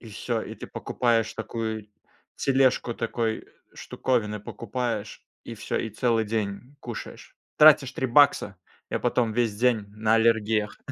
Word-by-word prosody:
И 115 - -13
всё, 110 +2 -3
и - - -7
ты - - -9
покупаешь 115 -2 0
такую 110 -1 -4 0.5
тележку, 130 -3 +2
такой 115 -1 -2 0.3
штуковины 105 -5 -2
покупаешь, 115 -1 -4 0.2
и - - -7
всё, - - -4
и 115 - -3
целый 115 +1 +1
день 110 +4 -4
кушаешь. 120 -2 -8 0.2
Тратишь 150 -4 +7
3 130 - -2
бакса, 125 -7 +4 0.3
и - - -1
потом 115 -3 0
весь 120 -3 +1
день 115 -3 +2
на 110 +2 +1
аллергиях. 110 -2 +2
115 Hz, 135 wpm, -26 LUFS, 110-125 Hz, 0.5 s, Тратишь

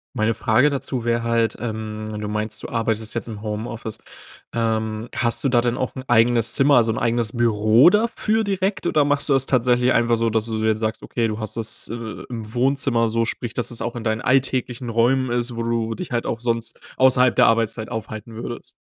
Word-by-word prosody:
Meine 110 +1 +1
Frage 125 +8 +3
dazu 130 -3 -1
wäre 115 0 0
halt, 115 -1 +1
ähm, 110 -2 -5
wenn 105 - -5
du 105 - -4
meinst, 105 0 -2
du - - -5
arbeitest 115 -1 -1
jetzt 115 - -2
im 105 -2 -7
Homeoffice. 110 +1 -3 0.6
Ähm, 110 -1 -1
hast 120 -2 +2
du 140 - +3
da 120 -2 +3
denn 120 0 -1
auch 130 - -3
'n 130 - -6
eigenes 115 -1 +4
Zimmer, 140 +1 +5
also 115 -2 +4
'n - - -4
eigenes 115 -1 0
Büro 115 +3 +4
dafür 220 +1 +1
direkt, 195 -2 -1
oder 150 -3 +2
machst 145 +1 0
du - - +4
das 135 0 +2
tatsächlich 125 0 +2
einfach 115 0 +2
so, 115 0 +1
dass 110 +1 -1
du 110 -1 -3
jetzt 110 0 +1
sagst, 110 0 -2
okay, 115 -2 -2
du 105 +1 -4
hast 110 0 -4
das, 115 -1 -4
äh, 115 -1 -7
im 110 -2 -7
Wohnzimmer. 125 -2 +1
So 115 +1 0
sprich, 120 0 -3
dass 120 -1 -2
es 115 - -5
auch 120 +1 -3
in 115 - -5
deinen 110 0 -1
alltäglichen 130 -2 0
Räumen 120 +2 +2
ist, 120 0 -1
wo 115 - -3
du 115 -1 -1
dich 180 -7 -7
halt 120 -1 -1
auch 115 - -3
sonst 115 -1 -1 0.2
außerhalb 130 -1 +4
der - - +4
Arbeitszeit 115 -1 +1
aufhalten 110 -1 -6
würdest? 120 +1 -7
115 Hz, 215 wpm, -22 LUFS, 110-125 Hz, 0.6 s, Zimmer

